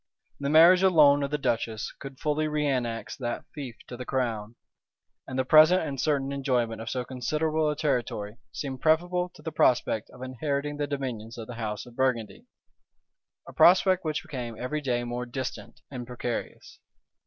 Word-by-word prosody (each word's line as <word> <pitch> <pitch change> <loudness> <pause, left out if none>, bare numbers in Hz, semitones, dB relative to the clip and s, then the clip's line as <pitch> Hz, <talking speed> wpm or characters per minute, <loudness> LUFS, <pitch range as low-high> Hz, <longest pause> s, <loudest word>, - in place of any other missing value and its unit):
The 140 0 -2
marriage 170 +4 +7
alone 150 -6 +6
of 140 - -1
the 150 - -1
duchess 115 -4 -2
could 135 -1 -9
fully 155 0 0
reannex 135 -6 -1
that 120 -3 -4
fief 135 -6 -7
to 125 - -8
the 125 - -6
crown; 115 -4 -2 0.7
and 130 - -5
the 130 - +1
present 155 +6 +6
and 140 -5 -3
certain 140 -1 0
enjoyment 125 -5 -1
of 115 - -5
so 125 -1 -2
considerable 155 +5 0
a 150 - -1
territory, 120 -8 -2
seemed 135 -3 -5
preferable 175 +3 +2
to - - -15
the 160 - -4
prospect 120 -6 +2
of 125 - -11
inheriting 140 +3 -3
the 145 -1 -1
dominions 125 -6 -4
of 115 - -6
the 120 - -8
house 110 -2 -4
of 120 -1 -14
Burgundy; 130 - -1 1.0
a - - -10
prospect 185 +1 +5
which 155 -2 -2
became 120 -4 -6
every 150 +6 -3
day 120 -3 0
more 120 +1 -4
distant 130 +1 -6
and 125 -3 -6
precarious. 125 -1 -5
135 Hz, 170 wpm, -27 LUFS, 120-150 Hz, 1.0 s, marriage